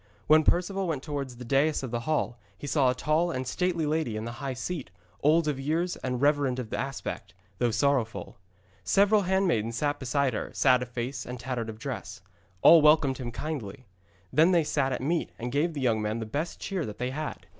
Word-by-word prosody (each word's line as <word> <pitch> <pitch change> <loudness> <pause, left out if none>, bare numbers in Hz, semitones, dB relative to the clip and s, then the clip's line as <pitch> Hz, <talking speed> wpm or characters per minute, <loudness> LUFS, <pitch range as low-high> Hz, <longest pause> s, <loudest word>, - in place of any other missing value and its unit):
When 155 +1 +6
Perceval 185 +4 +1
went 150 -5 -2
towards 140 -4 -4
the 125 - -8
dais 140 +4 +2
of 130 - -5
the 120 - -1
hall 120 -6 0 0.2
he - - -8
saw 140 -3 +3
a 125 - 0
tall 155 +6 +1
and 130 -6 -3
stately 170 +3 0
lady 150 -7 -1
in 110 - -4
the 115 - -4
high 135 -2 -3
seat, 155 - -4 0.3
old 155 +2 +4
of 145 -3 -1
years 165 +6 -1
and 125 -1 -3
reverend 145 -2 +2
of 125 -4 -5
aspect, 135 0 -4 0.2
though 120 - +2
sorrowful. 115 -3 0 0.4
Several 200 - +4
handmaids 175 - +1
sat 145 -1 0
beside 130 0 0
her, - - -3
sad 125 -2 +4
of 125 - -5
face 125 +1 -4
and 125 0 -7
tattered 120 -2 -3
of 110 - -7
dress. - - -6 0.4
All 165 -1 +9
welcomed 150 -3 +4
him 125 - -4
right 120 - -6
kindly. 130 -6 -5 0.5
Then 165 +4 +5
they 170 -2 +4
sat 140 -3 0
at 125 - -2
meat, 165 +4 -1
and 120 +1 -4
gave 155 +4 0
the 140 - -3
young 115 -4 +2
man 105 +1 -1
the 115 - -4
best 145 +10 -4
cheer 190 -4 -3
that 105 -6 -6
they 125 +2 -2
had. 155 +3 -5
140 Hz, 210 wpm, -28 LUFS, 125-155 Hz, 0.5 s, All